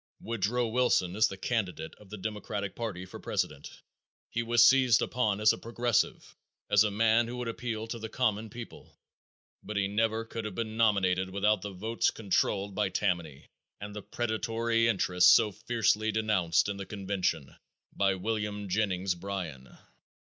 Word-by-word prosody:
Woodrow 115 +2 -1
Wilson 110 -6 +1
is 110 +1 +4
the 95 - -7
candidate 95 -7 -2
of 105 - -17
the 105 - -7
Democratic 100 -1 -4
party 100 -6 -4
for - - -10
president. - - -3 0.6
He 115 - -1
was 115 0 +5
seized 130 -2 +5
upon 110 -5 0
as 105 0 +5
a - - -7
"progressive"; 120 0 -1 0.4
as 105 0 +6
a 105 - +1
man 115 +3 +3
who 125 +1 -6
would 125 -1 -4
appeal 115 -1 -4
to 115 +1 -6
the 110 0 -6
common 110 -3 0
people, 115 +2 -11 0.6
but 105 - -5
he 100 -1 +1
never 110 +2 0
could 115 0 -6
have 105 -3 -5
been 110 0 -3
nominated 95 -5 +2
without 100 +1 +1
the 105 - -5
votes 110 +5 0
controlled 100 -1 0
by 105 0 0
Tammany 85 -9 -2 0.3
and 105 0 -7
the 105 - -5
"predatory 115 +1 0
interests" 90 -4 +4
so 110 -2 +5
fiercely 110 0 0
denounced 105 -7 +2
in 100 -1 -3
the 100 - -6
convention 95 -8 -2 0.4
by 95 -1 +2
William 105 0 -3
Jennings 95 -1 0
Bryan. 85 -8 -6
105 Hz, 160 wpm, -29 LUFS, 95-115 Hz, 0.6 s, as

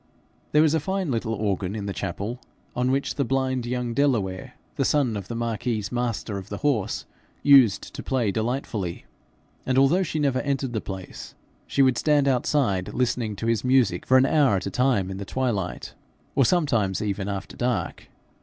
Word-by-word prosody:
There 150 +1 +5
was 155 -1 +3
a 160 - +3
fine 190 0 -2
little 115 -1 -1
organ 100 -2 -2
in 105 -2 -4
the 100 - -3
chapel, 100 +7 -4 0.4
on 125 +1 +1
which 135 +1 0
blind 130 -2 0
young 125 -1 -2
Delaware, 115 -9 0 0.2
the - - 0
son 135 -7 +2
of 100 -3 -5
the 115 - -5
marquis's 115 -2 -2
master 120 -4 -2
of 95 +2 -11
the 100 - -4
horse, 110 -8 0 0.4
used 130 -8 +5
to - - -6
play 125 -6 0
delightfully; 110 -5 -3 0.6
and 130 0 0
although 135 +8 +4
she 165 -4 -2
never 140 -4 +1
entered 135 -3 -2
the 110 - -1
place, 95 -2 -8 0.3
she 140 - +3
would 130 -2 +3
stand 145 -2 +3
outside 125 -7 +1
listening 120 -4 0
to 115 - -5
his 115 -2 +1
music 125 -9 +2
for 130 - +6
an 130 - +5
hour 140 -7 +3
at 95 - -2
a 100 - -3
time 120 -6 +1
in 95 - -5
the 100 - -5
twilight, 100 -4 -2 0.4
or 135 -2 +3
sometimes 120 - +1
even 100 -1 -2
after 100 -1 -5
dark. 125 -2 -2
120 Hz, 180 wpm, -25 LUFS, 100-135 Hz, 0.6 s, for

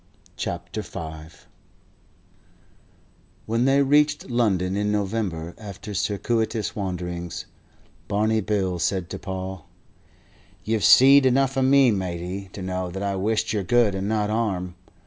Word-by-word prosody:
CHAPTER 85 +4 -4
V 80 -4 -8 2.1
WHEN 115 +3 +1
they 135 +1 +4
reached 145 -1 +2
London 95 -6 +1
in 105 0 0
November, 95 -5 -2
after 100 -1 -8
circuitous 110 +2 -1
wanderings, 90 -3 -4 0.6
Barney 110 +2 +1
Bill 95 -3 -1
said 95 0 -1
to - - -5
Paul: 95 -3 -6 1.0
"You've 110 -2 -1
seed 135 +1 +7
enough 135 +2 +2
of 135 -1 +2
me, 135 -2 +5
matey, 95 0 -4
to 95 - -7
know 90 -1 -3
that 95 +3 -5
I 100 -1 -1
wish 110 +3 0
yer 105 - 0
good 115 +1 +3
and 95 +1 -2
not 105 -1 0
harm. 95 -6 -1
100 Hz, 125 wpm, -24 LUFS, 90-115 Hz, 2.1 s, seed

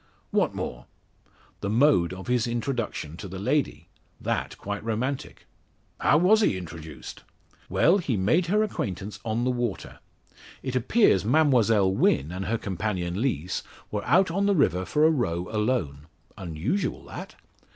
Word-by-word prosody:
"What - - +1
more?" 60 +1 -5 0.7
"The 100 - -3
mode 110 - +4
of 95 +1 -7
his 125 -1 +1
introduction 115 - -3
to 100 - -7
the 95 +1 -7
lady 100 - -1 0.3
that - - -2
quite 100 +1 -5
romantic." 120 +5 -3 0.5
"How - - +4
was 200 +7 +5
he 100 - +2
introduced?" 80 -3 -9 0.5
"Well, 190 +4 +4
he 135 - -1
made 140 - +2
her 210 +4 +3
acquaintance 100 - -4
on 115 +1 -1
the 130 - +2
water. 120 -4 -3 0.6
It 130 -1 -3
appears 130 - +3
Mademoiselle 115 -7 +3
Wynn 75 -5 +2
and 95 +1 -4
her 115 +5 0
companion 95 -2 -3
Lees, 95 - -1 0.3
were 105 -1 -2
out 175 +6 +4
on 200 +3 +1
the 200 - +3
river 95 - +2
for 150 - +2
a 160 - +6
row 90 - -1
alone. 105 - -1 0.3
Unusual 95 - -3
that! - - -9
110 Hz, 150 wpm, -26 LUFS, 95-140 Hz, 0.7 s, a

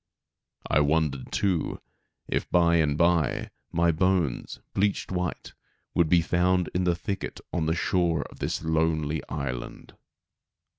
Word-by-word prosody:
I - - +3
wondered 75 -2 +1
too, 95 -5 0 0.5
if - - -2
bye 85 -1 +4
and 75 -3 +2
bye 85 -2 +2 0.2
my 85 0 +3
bones, 85 -4 0
bleached 100 0 0
white, 90 -2 -3 0.4
would 85 -2 +3
be 85 0 +5
found 90 0 +1
in 90 0 0
the 90 -1 +2
thicket 100 +3 -4
on 80 -3 0
the 80 - +1
shore 85 -4 +1
of - - -15
this - - -2
lonely 80 -2 +1
island. 70 -5 -5
85 Hz, 135 wpm, -27 LUFS, 80-90 Hz, 0.5 s, be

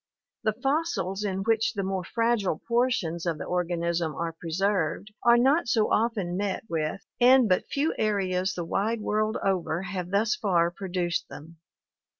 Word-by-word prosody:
The 215 - +1
fossils 270 - 0
in 195 -1 -2
which 225 +1 +1
the 200 -3 -2
more 190 -1 -2
fragile 230 -6 0
portions 230 -9 0
of 165 -2 0
the - - -5
organism 170 -2 -1
are 165 +1 -3
preserved 185 +3 -1
are 235 0 +6
not 270 +6 +3
so 220 -2 +2
often 210 -6 0
met 195 0 -2
with 165 +1 -3
and 255 0 +6
but 185 -2 +1
few 290 +3 0
areas 190 -3 0
the 175 - -3
wide 215 +6 -1
world 215 +1 0
over 180 -3 0
have 185 -2 -4
thus 210 +4 +2
far 175 -6 +1
produced 175 -2 -2
them. 160 +3 -11
195 Hz, 155 wpm, -27 LUFS, 175-225 Hz, -, are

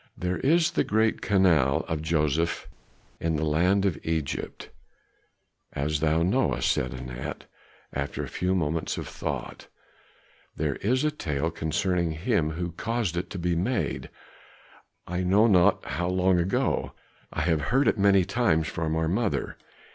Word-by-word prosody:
"There 90 0 -2
is 165 +4 +3
the - - +1
great 110 +1 +1
canal 85 -9 +3
of 80 -1 -2
Joseph 80 0 0 0.5
in 80 -1 0
the 75 +1 0
land 90 +6 +2
of 90 -7 0
Egypt, 80 -4 -3 1.0
as 75 +2 -1
thou 80 +2 +2
knowest," 85 - +2
said 65 - -1
Anat, 60 0 -6 0.5
after - - -3
a - - -5
few 90 +1 -1
moments 80 -2 -1
of - - -5
thought; - - -5 0.9
"there - - -1
is 130 +7 +1
a 150 - +2
tale 80 - -2
concerning 85 +2 0
him 85 -1 0
who 85 +1 -3
caused 110 0 -2
it 85 - -3
to - - -6
be 85 0 0
made, 100 +10 -1 1.0
I 90 +1 -2
know 95 +4 +4
not 95 -2 +4
how 90 +6 -2
long 90 0 +2
ago. 90 +3 0 0.4
I - - -2
have 80 -1 +1
heard 135 +3 +3
it - - +2
many 100 -2 +5
times 95 -7 +1
from 80 -1 -2
our 80 0 0
mother. 100 +5 -1
85 Hz, 150 wpm, -27 LUFS, 80-100 Hz, 1.0 s, many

